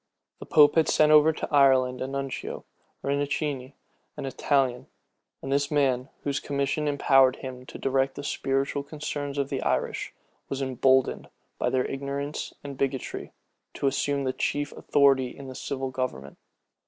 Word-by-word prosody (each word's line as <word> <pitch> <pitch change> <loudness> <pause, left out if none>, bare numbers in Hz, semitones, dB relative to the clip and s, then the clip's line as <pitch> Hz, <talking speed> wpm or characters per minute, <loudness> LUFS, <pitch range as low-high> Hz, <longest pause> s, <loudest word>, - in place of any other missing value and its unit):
The - - -9
pope 150 -1 +6
had 160 - +4
sent 155 0 +4
over 155 +1 +7
to 160 - -5
Ireland 130 -3 +4
a 130 - -2
nuncio, 135 0 -5 0.4
Rinuccini, 140 -1 -2 0.4
an - - -4
Italian; 135 -2 0 0.6
and 135 - -4
this 140 0 +1
man, 135 -3 +1
whose 140 -1 -1
commission 140 +2 -1
empowered 135 -2 +4
him 130 -1 -8
to - - -8
direct 135 0 0
the 145 - -6
spiritual 135 0 -1
concerns 145 -1 -5
of 140 -1 -1
the - - -2
Irish, - - -1 0.4
was 135 - -3
emboldened, 130 0 +2 0.3
by - - +1
their 130 -1 +1
ignorance 140 +2 -4
and 140 -2 -8
bigotry, 135 -1 -3 0.4
to - - -3
assume 140 +1 +1
the 130 -1 -1
chief 145 +2 -1
authority 135 -3 +2
in 140 - -9
the - - -7
civil 135 0 -4
government. 130 - -4
140 Hz, 155 wpm, -27 LUFS, 130-145 Hz, 0.6 s, over